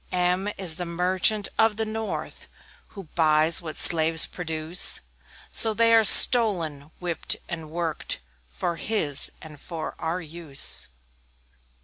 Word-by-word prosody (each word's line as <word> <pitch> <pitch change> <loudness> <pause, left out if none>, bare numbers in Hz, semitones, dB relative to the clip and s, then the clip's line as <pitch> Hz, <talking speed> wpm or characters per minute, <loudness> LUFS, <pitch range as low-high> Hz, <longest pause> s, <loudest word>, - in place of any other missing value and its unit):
M 180 +2 -2
M 210 - -6
is 175 -4 -2
the 180 - -6
Merchant 185 +4 -2
of 220 -1 0
the 220 - -4
north, 220 0 -8 0.4
Who 195 - -13
buys 160 +1 0
what 155 -2 -10
slaves 160 -1 +5
produce 160 0 -3 0.5
So 220 -1 +5
they 230 +1 +1
are 225 -1 +3
stolen, 175 - +6
whipped 175 -3 -4
and 165 -3 -9
worked, 165 - -6 0.3
For 115 - -6
his, 155 -9 -1
and 150 -2 -15
for 165 -2 -9
our 165 +3 -5
use. 160 - -3
170 Hz, 130 wpm, -22 LUFS, 160-200 Hz, 0.5 s, stolen